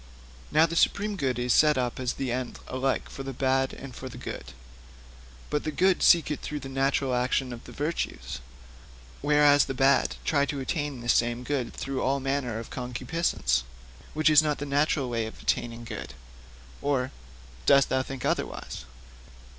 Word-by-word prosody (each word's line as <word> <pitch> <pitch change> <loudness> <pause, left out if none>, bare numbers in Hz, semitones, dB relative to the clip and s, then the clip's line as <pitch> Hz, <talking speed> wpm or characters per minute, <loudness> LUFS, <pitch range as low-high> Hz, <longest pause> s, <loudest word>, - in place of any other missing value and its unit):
'Now, 155 +2 +6
the 165 0 -4
supreme 205 +4 +2
good 130 - -1
is 125 0 +1
set 150 -2 +5
up 125 -1 -1
as 125 -1 -1
the 135 -3 -3
end 125 0 -3
alike 130 +1 -1
for - - -8
the 135 0 -5
bad 130 +1 +1
and 135 -3 -9
for 130 - -7
the - - -10
good; - - -6 1.1
but 150 - 0
the - - -2
good 185 +5 +3
seek 170 -3 +5
it 150 - -2
through 150 -1 -4
the 135 - -7
natural 135 0 +1
action 125 +1 0
of 120 - -10
the - - -10
virtues, 150 - -3 0.8
whereas 145 0 +5
the 135 - -4
bad 135 +1 +3
try 140 -2 +2
to 145 -1 -3
attain 145 -1 -3
this 120 0 +3
same 120 +1 +1
good 125 -3 -2
through 135 -1 -4
all 140 +1 +1
manner 135 -4 -1
of 115 - -7
concupiscence, 125 - -1 0.5
which 155 0 +4
is 150 0 +8
not 150 -2 0
the 145 - -4
natural 140 -1 +1
way 115 -2 -1
of 110 - -10
attaining 120 0 -1
good. 115 - -7 0.7
Or 135 -2 0 0.6
dost 140 -1 +6
thou 130 - +2
think 130 -1 -6
otherwise?' - - -3
135 Hz, 180 wpm, -27 LUFS, 125-145 Hz, 1.1 s, is